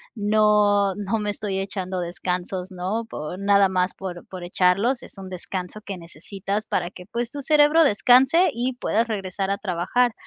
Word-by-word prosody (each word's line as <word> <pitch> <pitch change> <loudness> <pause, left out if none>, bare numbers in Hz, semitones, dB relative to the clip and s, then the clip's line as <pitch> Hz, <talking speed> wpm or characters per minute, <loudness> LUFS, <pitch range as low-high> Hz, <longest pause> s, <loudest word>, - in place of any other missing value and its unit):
no 210 -2 +3
no 205 +2 -2
me 210 0 -2
estoy 200 -2 -3
echando 190 -1 -4
descansos", 180 +1 -3
¿no?, 190 +5 -3
po 155 0 -6
nada 200 0 +4
más 185 0 0
por 180 -2 -7
por 185 -2 -8
echarlos. 190 +8 +2
Es - - -13
un 190 -1 -8
descanso 185 +2 -6
que 200 -3 -6
necesitas 195 +5 -5
para 175 -1 -1
que, 180 - -12
pues, 235 0 -3
tu 285 - -6
cerebro 300 +3 +5
descanse 265 - +5
y 245 +3 -1
puedas 235 -2 0
regresar 195 -3 -3
a 200 - 0
trabajar. 200 +5 0
200 Hz, 170 wpm, -23 LUFS, 185-220 Hz, -, cerebro